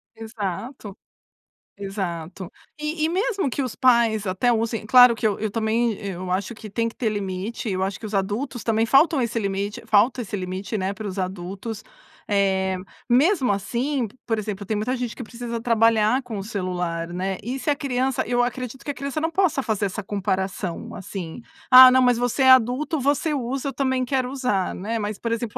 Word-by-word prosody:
Exato, 220 Hz, 0 st, -6 dB, 0.8 s
exato. 190 Hz, -3 st, -5 dB, 0.3 s
E 305 Hz, +1 st, -2 dB
e -, -, +1 dB
mesmo 390 Hz, -, 0 dB
que 270 Hz, -, -2 dB
os 255 Hz, -4 st, -4 dB
pais 235 Hz, -4 st, +3 dB
até 190 Hz, +6 st, +1 dB
usem 225 Hz, -1 st, -1 dB
claro 245 Hz, +1 st, +7 dB
que 225 Hz, -, -4 dB
eu 205 Hz, -, -2 dB
eu 215 Hz, -, -1 dB
também 225 Hz, +1 st, +1 dB
eu 185 Hz, -1 st, -4 dB
acho 190 Hz, +5 st, -1 dB
que 215 Hz, -1 st, -10 dB
tem 230 Hz, +3 st, -1 dB
que 230 Hz, -, -7 dB
ter 230 Hz, -, 0 dB
limite, 205 Hz, +2 st, -4 dB
eu 190 Hz, -1 st, -1 dB
acho 195 Hz, 0 st, -3 dB
que -, -, -8 dB
os 215 Hz, -, -7 dB
adultos 210 Hz, +6 st, -2 dB
também 225 Hz, 0 st, +2 dB
faltam 275 Hz, +4 st, +4 dB
esse 235 Hz, -1 st, -1 dB
limite 200 Hz, 0 st, -3 dB
faltam 225 Hz, +4 st, +3 dB
esse 210 Hz, -3 st, -5 dB
limite, 190 Hz, +3 st, -4 dB
né, 190 Hz, 0 st, -1 dB
para 215 Hz, +1 st, -6 dB
os 195 Hz, 0 st, -5 dB
adultos. 190 Hz, +4 st, -5 dB, 0.4 s
Eh, 190 Hz, -2 st, +1 dB, 0.3 s
mesmo 270 Hz, -, +3 dB
assim, 240 Hz, +6 st, -1 dB
p 205 Hz, -, -19 dB
por 225 Hz, -2 st, 0 dB
exemplo, 205 Hz, -1 st, -5 dB
tem 215 Hz, +2 st, -1 dB
muita 235 Hz, +5 st, -1 dB
gente 245 Hz, -2 st, -3 dB
que 250 Hz, -, -7 dB
precisa 235 Hz, 0 st, -5 dB
trabalhar 230 Hz, +1 st, +3 dB
com 235 Hz, -4 st, -6 dB
o 195 Hz, -, -4 dB
celular, 180 Hz, -5 st, -3 dB
né, 185 Hz, +2 st, -2 dB
e 250 Hz, +5 st, -4 dB
se 295 Hz, -, -2 dB
a 290 Hz, -, +3 dB
criança 265 Hz, -3 st, -1 dB
eu 245 Hz, +1 st, +1 dB
acredito 250 Hz, +1 st, -4 dB
que 290 Hz, -, -1 dB
a -, -, -7 dB
criança 280 Hz, +2 st, -4 dB
não 325 Hz, +1 st, 0 dB
possa 350 Hz, -5 st, +1 dB
fazer 220 Hz, -5 st, -1 dB
essa 195 Hz, +3 st, -5 dB
comparação, 190 Hz, -2 st, -3 dB
assim: 185 Hz, +1 st, -7 dB, 0.3 s
"Ah, 255 Hz, 0 st, +11 dB
não, 260 Hz, 0 st, +5 dB
mas 245 Hz, -2 st, +4 dB
você 245 Hz, +3 st, 0 dB
é 260 Hz, -, +8 dB
adulto, 260 Hz, +5 st, +3 dB
você 290 Hz, +4 st, +1 dB
usa, 270 Hz, +1 st, -2 dB
eu -, -, -6 dB
também 260 Hz, 0 st, 0 dB
quero 255 Hz, -1 st, -1 dB
usar", 250 Hz, -9 st, -1 dB
né. 220 Hz, +5 st, -3 dB
Mas, 210 Hz, -1 st, -4 dB
por 230 Hz, -, -3 dB
exemplo, 230 Hz, -1 st, -4 dB
225 Hz, 200 wpm, -23 LUFS, 195-255 Hz, 0.8 s, Ah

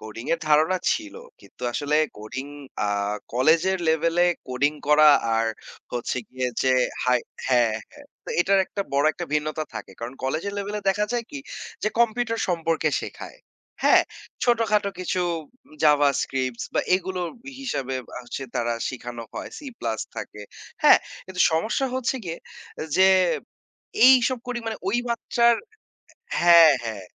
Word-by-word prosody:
Coding 110 Hz, +2 st, -9 dB
এর -, -, -7 dB
ধারণা 155 Hz, +5 st, +4 dB, 0.2 s
ছিল। 315 Hz, -2 st, -5 dB, 0.3 s
কিন্তু -, -, -18 dB
আসলে 150 Hz, +2 st, 0 dB, 0.2 s
কোডিং 130 Hz, +6 st, -6 dB, 0.4 s
আ -, -, -1 dB, 0.4 s
কলেজের 165 Hz, +9 st, +3 dB
লেভেলে 165 Hz, +2 st, +2 dB, 0.2 s
কোডিং 140 Hz, +4 st, +1 dB, 0.2 s
করা 150 Hz, 0 st, +7 dB, 0.3 s
আর 115 Hz, 0 st, +1 dB, 0.5 s
হচ্ছে 120 Hz, +1 st, -2 dB
গিয়ে 130 Hz, -1 st, -2 dB
যে 130 Hz, -, +3 dB, 0.3 s
হাই 125 Hz, -1 st, +3 dB, 0.3 s
হ্যাঁ, 120 Hz, -4 st, +3 dB, 0.2 s
হ্যাঁ। 290 Hz, -1 st, -15 dB, 0.2 s
তো -, -, -11 dB
এটার 195 Hz, +2 st, +3 dB
একটা 200 Hz, -, -5 dB
বড় 140 Hz, +1 st, +2 dB
একটা 175 Hz, -, -5 dB
ভিন্নতা 155 Hz, +1 st, -1 dB
থাকে। -, -, -7 dB
কারণ 120 Hz, +2 st, -6 dB
কলেজের 155 Hz, +9 st, -2 dB
লেভেলে 205 Hz, +1 st, -3 dB
দেখা 210 Hz, +2 st, +2 dB
যায় 240 Hz, -1 st, -1 dB
কি, 290 Hz, -, -6 dB, 0.4 s
যে 215 Hz, -, +2 dB
কম্পিউটার 230 Hz, 0 st, +1 dB
সম্পর্কে 165 Hz, -2 st, 0 dB
শেখায়। -, -, -9 dB, 0.4 s
হ্যাঁ? -, -, +6 dB, 0.4 s
ছোট-খাটো 220 Hz, -4 st, +2 dB
কিছু 185 Hz, 0 st, -1 dB, 0.6 s
জাভাস্ক্রিপ্টস 135 Hz, -4 st, +2 dB
বা -, -, +3 dB
এগুলো 185 Hz, 0 st, -2 dB, 0.4 s
হিসাবে 135 Hz, -, -3 dB, 0.2 s
আ -, -, -7 dB, 0.2 s
সে 135 Hz, -, -5 dB
তারা 120 Hz, -1 st, 0 dB
শিখানো 120 Hz, -2 st, -7 dB
হয়। -, -, -6 dB
সি 300 Hz, -, -10 dB
প্লাস 115 Hz, -1 st, -2 dB, 0.2 s
থাকে, 105 Hz, -, -7 dB, 0.4 s
হ্যাঁ? -, -, +8 dB, 0.3 s
কিন্তু 185 Hz, -1 st, -6 dB
সমস্যা 220 Hz, +11 st, 0 dB
হচ্ছে 260 Hz, 0 st, -1 dB
গিয়ে 165 Hz, -1 st, -5 dB, 0.6 s
যে 190 Hz, 0 st, +6 dB, 1.0 s
এইসব 255 Hz, 0 st, +5 dB
করি 245 Hz, -1 st, -2 dB
মানে 220 Hz, -1 st, -3 dB
ওই 215 Hz, -, +1 dB
মাত্রার 235 Hz, 0 st, +2 dB, 0.9 s
হ্যাঁ, 170 Hz, -3 st, +8 dB
হ্যাঁ। 110 Hz, -4 st, -5 dB
165 Hz, 140 wpm, -24 LUFS, 130-210 Hz, 1.0 s, হ্যাঁ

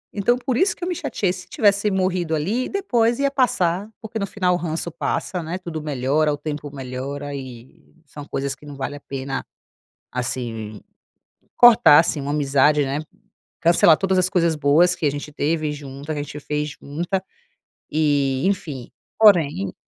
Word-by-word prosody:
então, 240 Hz, +4 st, +2 dB
por 255 Hz, -1 st, -2 dB
isso 385 Hz, +6 st, +2 dB
que -, -, -10 dB
eu -, -, -1 dB
me 355 Hz, -, -2 dB
chateei, 185 Hz, -10 st, -1 dB
se 185 Hz, -1 st, -10 dB
tivesse 205 Hz, 0 st, +2 dB
morrido 185 Hz, -4 st, 0 dB
ali, 210 Hz, +12 st, -1 dB
depois 240 Hz, -, +1 dB
ia 280 Hz, 0 st, +1 dB
passar 200 Hz, -7 st, +1 dB
porque 220 Hz, 0 st, -5 dB
no 200 Hz, -, -2 dB
final 185 Hz, -3 st, 0 dB
o 175 Hz, -, +1 dB
ranço 165 Hz, 0 st, -3 dB
passa, 175 Hz, +2 st, -2 dB
né, 170 Hz, +3 st, -4 dB
tudo 170 Hz, -4 st, -6 dB
melhora, 150 Hz, +1 st, 0 dB
o -, -, -4 dB
tempo 145 Hz, -1 st, -5 dB
melhora 140 Hz, +2 st, -5 dB
e 130 Hz, +4 st, -11 dB
são 145 Hz, +1 st, -10 dB
coisas 140 Hz, -1 st, -3 dB
que 145 Hz, -, -17 dB
não 145 Hz, -1 st, -9 dB
vale 140 Hz, +1 st, -4 dB
a -, -, -9 dB
pena, 135 Hz, -1 st, -5 dB, 0.7 s
assim, 115 Hz, -4 st, -4 dB, 0.8 s
cortar 230 Hz, -11 st, +8 dB
assim, 160 Hz, -3 st, -1 dB
uma 140 Hz, +1 st, -4 dB
amizade, 145 Hz, 0 st, +3 dB
né. 140 Hz, +2 st, -2 dB, 0.6 s
Cancelar 170 Hz, -1 st, +5 dB
todas 190 Hz, -1 st, +1 dB
as 185 Hz, -, +3 dB
coisas 170 Hz, -3 st, +2 dB
boas 155 Hz, +5 st, +4 dB
que -, -, -6 dB
a -, -, +3 dB
gente 145 Hz, +1 st, -6 dB
teve 155 Hz, 0 st, -1 dB
junta 145 Hz, +1 st, -7 dB
que 145 Hz, -, -3 dB
a -, -, -2 dB
gente 145 Hz, +1 st, -7 dB
fez 150 Hz, +1 st, -3 dB
junta 175 Hz, +7 st, -3 dB, 0.7 s
e 145 Hz, -3 st, +1 dB
enfim, 150 Hz, -11 st, -3 dB, 0.3 s
porém 160 Hz, -, +4 dB
155 Hz, 175 wpm, -22 LUFS, 140-185 Hz, 0.8 s, cortar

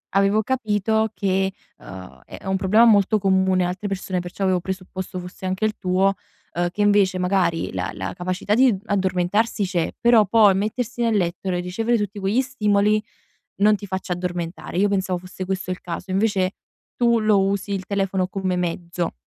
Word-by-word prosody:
avevo 200 Hz, +2 st, +3 dB
capito 220 Hz, -3 st, 0 dB
che, 190 Hz, -1 st, 0 dB, 0.3 s
uhm, 80 Hz, -9 st, -11 dB
è -, -, -10 dB
è -, -, -15 dB
un 190 Hz, 0 st, 0 dB
problema 215 Hz, +5 st, +4 dB
molto 215 Hz, -1 st, +4 dB
comune 190 Hz, -2 st, +2 dB
a -, -, -1 dB
altre 185 Hz, +3 st, -4 dB
persone, 190 Hz, -1 st, -3 dB
perciò 180 Hz, +3 st, -5 dB
avevo 185 Hz, -1 st, +2 dB
presupposto 185 Hz, 0 st, -6 dB
fosse 180 Hz, +1 st, -9 dB
anche 185 Hz, +3 st, -1 dB
il 215 Hz, -, -1 dB
tuo, 190 Hz, +2 st, +2 dB, 0.4 s
uhm, 175 Hz, 0 st, 0 dB
che 205 Hz, +4 st, -4 dB
invece 205 Hz, -2 st, +3 dB
magari 180 Hz, -, 0 dB
la 90 Hz, -1 st, -3 dB
la 95 Hz, -1 st, -5 dB
capacità 185 Hz, +3 st, -2 dB
di 250 Hz, -1 st, +4 dB
addormentarsi 195 Hz, +3 st, 0 dB
c'è, 175 Hz, -3 st, -1 dB
però 235 Hz, -3 st, +5 dB
poi 205 Hz, -1 st, +5 dB
mettersi 230 Hz, +4 st, -2 dB
nel 230 Hz, -3 st, +2 dB
letto 175 Hz, +1 st, -2 dB
re 180 Hz, -1 st, 0 dB
ricevere 225 Hz, +6 st, 0 dB
tutti 205 Hz, 0 st, -4 dB
quegli 200 Hz, +6 st, +1 dB
stimoli 210 Hz, -4 st, +1 dB, 0.6 s
non 210 Hz, +1 st, +5 dB
ti 205 Hz, 0 st, -8 dB
faccia 190 Hz, -1 st, -3 dB
addormentare. 175 Hz, -1 st, -5 dB
Io 205 Hz, +2 st, +4 dB
pensavo 190 Hz, -2 st, -1 dB
fosse 185 Hz, +1 st, -8 dB
questo 185 Hz, -1 st, -3 dB
il 180 Hz, -, -4 dB
caso, 180 Hz, +2 st, -6 dB
invece 195 Hz, -1 st, +1 dB, 0.4 s
tu 235 Hz, -1 st, +3 dB
lo 215 Hz, -2 st, +3 dB
usi 200 Hz, +1 st, -1 dB
il 190 Hz, -1 st, -3 dB
telefono 195 Hz, -2 st, -1 dB
come 190 Hz, -1 st, -2 dB
mezzo. 170 Hz, 0 st, -3 dB
190 Hz, 180 wpm, -22 LUFS, 180-210 Hz, 0.6 s, però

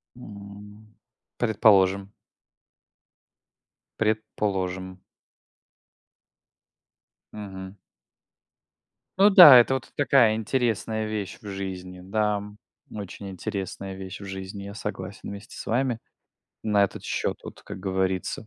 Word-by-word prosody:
М. 105 Hz, -1 st, -12 dB, 0.4 s
Предположим. 100 Hz, -3 st, +3 dB, 1.9 s
Предположим. 95 Hz, -4 st, -2 dB, 2.3 s
Мгм. 95 Hz, -2 st, -8 dB, 1.4 s
Ну 205 Hz, +2 st, +7 dB
да, 175 Hz, -9 st, +11 dB
это 120 Hz, +2 st, +5 dB
вот 130 Hz, -, -4 dB
такая 120 Hz, -5 st, +4 dB
интересная 110 Hz, -2 st, -1 dB
вещь 105 Hz, -3 st, -4 dB
в 105 Hz, -, -11 dB
жизни. 95 Hz, -2 st, -6 dB
Да, 105 Hz, +2 st, 0 dB
м, 105 Hz, +1 st, -9 dB, 0.3 s
очень 100 Hz, -1 st, -7 dB
интересная 95 Hz, +1 st, -5 dB
вещь 95 Hz, +1 st, -8 dB
в -, -, -8 dB
жизни. 95 Hz, +1 st, -7 dB
Я 100 Hz, 0 st, -8 dB
согласен 100 Hz, -2 st, -6 dB
вместе 100 Hz, +2 st, -10 dB
с -, -, -7 dB
вами 120 Hz, 0 st, 0 dB, 0.7 s
на 105 Hz, -2 st, +3 dB
этот -, -, -5 dB
счет -, -, -2 dB
вот, -, -, -10 dB
как -, -, -9 dB
говорится. 95 Hz, +2 st, -2 dB
100 Hz, 100 wpm, -25 LUFS, 95-110 Hz, 2.3 s, да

